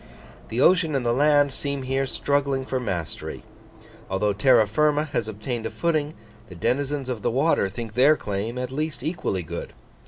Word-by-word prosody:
The 115 Hz, -, -2 dB
ocean 165 Hz, -2 st, +4 dB
and 130 Hz, -3 st, -1 dB
the 120 Hz, -, +2 dB
land 145 Hz, +1 st, +4 dB
seem 140 Hz, 0 st, -3 dB
here 135 Hz, +1 st, 0 dB
struggling 140 Hz, -1 st, 0 dB
for 130 Hz, 0 st, -2 dB
mastery: 95 Hz, -10 st, -4 dB, 0.7 s
although 100 Hz, +2 st, +1 dB
terra 115 Hz, +2 st, +5 dB
firma 150 Hz, +7 st, +2 dB
has 115 Hz, -4 st, 0 dB
obtained 110 Hz, +2 st, -4 dB
a -, -, -5 dB
footing, 155 Hz, -3 st, -1 dB, 0.3 s
the 90 Hz, -, -10 dB
denizens 135 Hz, -, -1 dB
of 125 Hz, -4 st, -3 dB
the -, -, +1 dB
water 135 Hz, -5 st, +2 dB
think 110 Hz, +2 st, -7 dB
their 140 Hz, +6 st, +5 dB
claim 105 Hz, +4 st, -3 dB
at 125 Hz, 0 st, -3 dB
least 155 Hz, +3 st, -3 dB
equally 155 Hz, -, -2 dB
good. 80 Hz, -, -6 dB
130 Hz, 175 wpm, -24 LUFS, 110-145 Hz, 0.7 s, terra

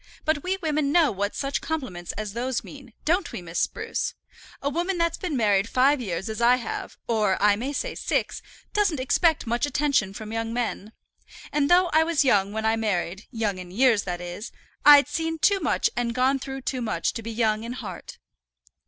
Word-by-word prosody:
But 310 Hz, -1 st, +1 dB
we 375 Hz, +4 st, -1 dB
women 300 Hz, -2 st, +1 dB
know 330 Hz, -1 st, +4 dB
what 200 Hz, 0 st, -2 dB
such 275 Hz, 0 st, -2 dB
compliments 235 Hz, -, -4 dB
as 210 Hz, -1 st, -5 dB
those 245 Hz, +2 st, -2 dB
mean; 270 Hz, -5 st, -12 dB
don't 345 Hz, +3 st, +1 dB
we, -, -, -5 dB
Miss 175 Hz, -1 st, -4 dB
Spruce? -, -, -2 dB, 0.4 s
A 275 Hz, -, -3 dB
woman 345 Hz, +6 st, -1 dB
that's 335 Hz, -1 st, +1 dB
been 345 Hz, -8 st, -3 dB
married 205 Hz, -2 st, +2 dB
five 270 Hz, +2 st, +3 dB
years 190 Hz, -3 st, -3 dB
as 220 Hz, +1 st, -4 dB
I 240 Hz, +1 st, +6 dB
have 245 Hz, -2 st, -5 dB
or 210 Hz, -5 st, +1 dB
I 205 Hz, -1 st, +4 dB
may 250 Hz, +7 st, -3 dB
say -, -, -3 dB
six, -, -, -2 dB, 0.3 s
doesn't 405 Hz, -9 st, +1 dB
expect 305 Hz, +4 st, +2 dB
much 240 Hz, +4 st, 0 dB
attention 280 Hz, -10 st, +1 dB
from 220 Hz, +1 st, -7 dB
young 225 Hz, 0 st, -2 dB
men. 230 Hz, -3 st, -3 dB, 0.6 s
And 295 Hz, -1 st, +1 dB
though 355 Hz, 0 st, +5 dB
I 315 Hz, +1 st, +5 dB
was 320 Hz, -3 st, +1 dB
young 200 Hz, -5 st, +3 dB
when 220 Hz, +1 st, -3 dB
I 220 Hz, 0 st, +3 dB
married 195 Hz, -3 st, -2 dB
young 215 Hz, -6 st, -2 dB
in 180 Hz, -1 st, -8 dB
years, 230 Hz, +2 st, +3 dB
that 175 Hz, -1 st, -4 dB
is, 175 Hz, +5 st, -7 dB, 0.3 s
I'd 285 Hz, -2 st, +8 dB
seen 325 Hz, +2 st, -2 dB
too 395 Hz, +5 st, +3 dB
much 315 Hz, -, +1 dB
and 235 Hz, -1 st, -1 dB
gone 260 Hz, +2 st, +2 dB
through 270 Hz, +1 st, -6 dB
too 255 Hz, 0 st, -3 dB
much 215 Hz, -8 st, -1 dB
to 230 Hz, -, -5 dB
be 225 Hz, -, -6 dB
young 220 Hz, -1 st, 0 dB
in 235 Hz, +1 st, -5 dB
heart." 210 Hz, -8 st, -8 dB
245 Hz, 200 wpm, -25 LUFS, 215-295 Hz, 0.6 s, I'd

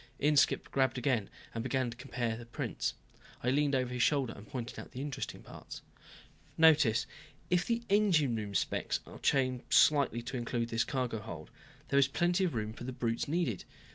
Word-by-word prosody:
Inskipp 145 Hz, 0 st, +3 dB
grabbed 135 Hz, -1 st, +2 dB
again 125 Hz, -5 st, 0 dB, 0.2 s
and 115 Hz, -, -3 dB
began 130 Hz, 0 st, -1 dB
comparing 120 Hz, -2 st, -3 dB
the 120 Hz, -, -9 dB
two -, -, -25 dB
prints. -, -, -3 dB, 0.5 s
I 125 Hz, -, +2 dB
leaned 145 Hz, 0 st, +2 dB
over 125 Hz, -1 st, 0 dB
his 125 Hz, -, -1 dB
shoulder 135 Hz, -4 st, +2 dB
and 100 Hz, -, -12 dB
pointed 120 Hz, -2 st, -5 dB
out -, -, -10 dB
the 125 Hz, -, -6 dB
interesting 140 Hz, -1 st, -5 dB
parts. -, -, -10 dB, 0.7 s
"Notice 150 Hz, -8 st, +5 dB, 0.5 s
if 180 Hz, 0 st, +2 dB
the 235 Hz, 0 st, 0 dB
engine 180 Hz, -, +3 dB
room 105 Hz, -2 st, -4 dB
specs -, -, 0 dB
are -, -, -11 dB
changed 130 Hz, -2 st, +1 dB
slightly 140 Hz, -6 st, +4 dB
to 125 Hz, +2 st, -4 dB
include 120 Hz, -1 st, -2 dB
this 115 Hz, 0 st, +1 dB
cargo 125 Hz, -4 st, -2 dB
hold, 85 Hz, -8 st, -8 dB, 0.4 s
there 140 Hz, -, +4 dB
is 135 Hz, -, +5 dB
plenty 175 Hz, +6 st, +1 dB
of 165 Hz, -, -2 dB
room 110 Hz, -1 st, -2 dB
for 120 Hz, -, -9 dB
the 130 Hz, -, -4 dB
brutes 115 Hz, -2 st, -2 dB
needed. 145 Hz, -, -1 dB
130 Hz, 185 wpm, -32 LUFS, 115-145 Hz, 0.7 s, Notice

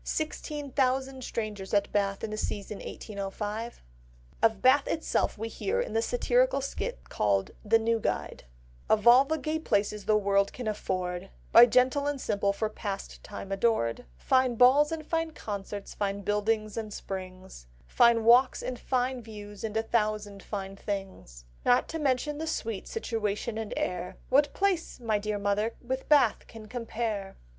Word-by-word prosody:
Sixteen 300 Hz, -2 st, -3 dB
thousand 265 Hz, 0 st, 0 dB
strangers 210 Hz, -5 st, -3 dB
at 200 Hz, 0 st, +1 dB
Bath 200 Hz, -1 st, 0 dB
in 220 Hz, -, -3 dB
the -, -, -2 dB
season 210 Hz, -1 st, -4 dB
1805!" 210 Hz, +3 st, -5 dB, 0.6 s
Of 220 Hz, -3 st, +3 dB
Bath 265 Hz, +5 st, +4 dB
itself 320 Hz, -7 st, 0 dB
we 220 Hz, +2 st, -3 dB
hear 405 Hz, -, -2 dB
in -, -, -2 dB
the 455 Hz, -, +2 dB
satirical -, -, +2 dB
skit 485 Hz, -, -5 dB
called 100 Hz, -2 st, +1 dB
The 225 Hz, +2 st, +4 dB
New 225 Hz, 0 st, +1 dB
Guide— -, -, -3 dB, 0.4 s
"Of 215 Hz, -1 st, +3 dB
all 250 Hz, +3 st, +8 dB
the 315 Hz, +3 st, -1 dB
gay 310 Hz, +1 st, -2 dB
places 210 Hz, -7 st, 0 dB
the 215 Hz, -, +4 dB
world 200 Hz, -1 st, +2 dB
can 245 Hz, -3 st, -5 dB
afford, 185 Hz, -4 st, -3 dB, 0.2 s
By 240 Hz, -, +10 dB
gentle 255 Hz, +4 st, +3 dB
and 290 Hz, -1 st, -1 dB
simple 200 Hz, -4 st, 0 dB
for 215 Hz, +2 st, -1 dB
pastime 200 Hz, -1 st, -6 dB
adored, 195 Hz, -, +1 dB
Fine 260 Hz, -, +2 dB
balls, 270 Hz, +6 st, +6 dB
and 320 Hz, -1 st, -4 dB
fine 325 Hz, 0 st, -1 dB
concerts, 205 Hz, -4 st, -6 dB
fine 200 Hz, -1 st, -2 dB
buildings 215 Hz, +1 st, 0 dB
and 220 Hz, -2 st, -4 dB
springs, 185 Hz, -, -8 dB, 0.2 s
Fine 230 Hz, -, +4 dB
walks 245 Hz, +3 st, +5 dB
and 250 Hz, -1 st, -4 dB
fine 255 Hz, 0 st, -1 dB
views 210 Hz, -2 st, -10 dB
and 220 Hz, -1 st, -2 dB
a 225 Hz, -, +1 dB
thousand 210 Hz, -3 st, -1 dB
fine 195 Hz, -2 st, -5 dB
things, 190 Hz, -, -6 dB, 0.2 s
Not 245 Hz, 0 st, +4 dB
to 325 Hz, -, -4 dB
mention 290 Hz, +1 st, 0 dB
the 320 Hz, -, -3 dB
sweet 225 Hz, -9 st, -3 dB
situation 225 Hz, -, -2 dB
and 220 Hz, -2 st, -5 dB
air, 180 Hz, 0 st, -3 dB
What 285 Hz, +3 st, +4 dB
place, 380 Hz, -7 st, 0 dB
my 220 Hz, -3 st, 0 dB
dear 210 Hz, 0 st, -2 dB
mother, 205 Hz, +3 st, 0 dB
with 260 Hz, +2 st, -4 dB
Bath 285 Hz, -7 st, +4 dB
can 220 Hz, -1 st, -11 dB
compare?" 220 Hz, -4 st, -4 dB
220 Hz, 160 wpm, -29 LUFS, 200-260 Hz, 0.6 s, By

